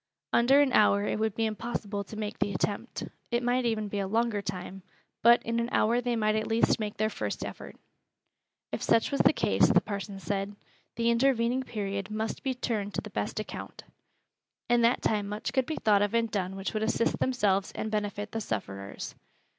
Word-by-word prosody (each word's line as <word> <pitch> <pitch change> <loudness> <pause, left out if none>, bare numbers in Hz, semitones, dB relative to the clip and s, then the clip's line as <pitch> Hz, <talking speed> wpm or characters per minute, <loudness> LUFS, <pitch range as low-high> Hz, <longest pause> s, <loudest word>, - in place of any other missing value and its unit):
Under 265 +4 +6
an 275 -3 +2
hour 205 -1 +5
it - - -1
would 220 -2 0
be 225 - +1
impossible 215 -2 -3
to 215 - -9
make 210 -1 -4
the 205 0 0
attempt 205 +6 -2 0.3
it 240 0 0
might 245 +1 +1
even 220 -2 0
be 205 0 -3
a 195 - -1
longer 225 0 +1
time, 195 0 -6 0.4
but 235 +1 +6
in 230 +1 -1
an 235 +1 -1
hour 235 +3 +3
they 245 -1 0
might 215 -1 +2
at 220 0 -1
least 230 +1 +2
make 210 -1 -4
their 215 - +2
first - - -3
effort. - - -8 1.0
If - - -3
such 230 - +3
was 280 - +2
the - - +6
case, - - +3
the - - +6
parson 200 -1 -5
said, 200 +1 -3 0.4
the 235 0 +2
intervening 240 0 +2
period 200 -4 -4
must 220 +1 -3
be 265 -1 -1
turned 210 -5 -2
to - - 0
the - - -10
best - - -2
account. - - -7 0.8
In 240 0 +4
that 235 +1 +3
time 210 -2 +1
much 210 +4 -4
could 260 -1 +1
be 315 - -2
thought 205 -3 +3
of 205 +2 +1
and 230 -1 +1
done 190 -2 -2
which 195 0 -4
would 215 - -1
assist 225 +1 +1
themselves 205 -7 +1
and 215 - -3
benefit 210 0 -2
the 225 - -3
sufferers. 100 - -5
215 Hz, 200 wpm, -29 LUFS, 205-235 Hz, 1.0 s, Under